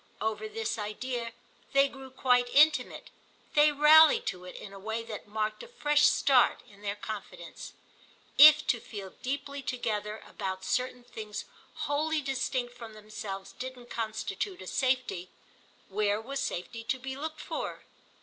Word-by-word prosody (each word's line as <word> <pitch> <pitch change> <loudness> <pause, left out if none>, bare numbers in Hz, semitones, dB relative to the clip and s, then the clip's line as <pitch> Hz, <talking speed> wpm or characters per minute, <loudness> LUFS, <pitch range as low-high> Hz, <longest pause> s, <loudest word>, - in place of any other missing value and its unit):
Over 215 0 -2
this 225 +1 -3
idea 230 +3 -4 0.4
they 275 0 +6
grew 270 -1 -11
quite 250 -1 +2
intimate; 300 +3 +3 0.4
they 295 0 +6
rallied 300 +2 +7
to 180 -2 -4
it 180 - -9
in 195 - -9
a 195 - -9
way 220 +3 -3
that 220 -2 -8
marked 215 0 -2
a - - -9
fresh 295 -11 +3
start 260 -3 +4
in 200 0 -18
their 205 -1 -2
confidence. 190 -5 -8 0.6
If 300 +1 +9
to 240 - +1
feel 200 -4 -8
deeply 280 +2 -3
together 215 -4 -3
about 190 -2 -5
certain 250 0 -1
things 215 -3 -7 0.4
wholly 310 +2 +1
distinct 260 -2 -2
from 230 -2 -9
themselves 210 -2 -7
didn't 250 -1 -8
constitute 230 - -3
a - - -10
safety, 255 -9 0 0.6
where 205 +1 +1
was 270 +5 -5
safety 225 +6 -4
to 260 - 0
be 265 +1 -6
looked 310 +2 -5
for? - - -5
240 Hz, 150 wpm, -30 LUFS, 210-275 Hz, 0.6 s, If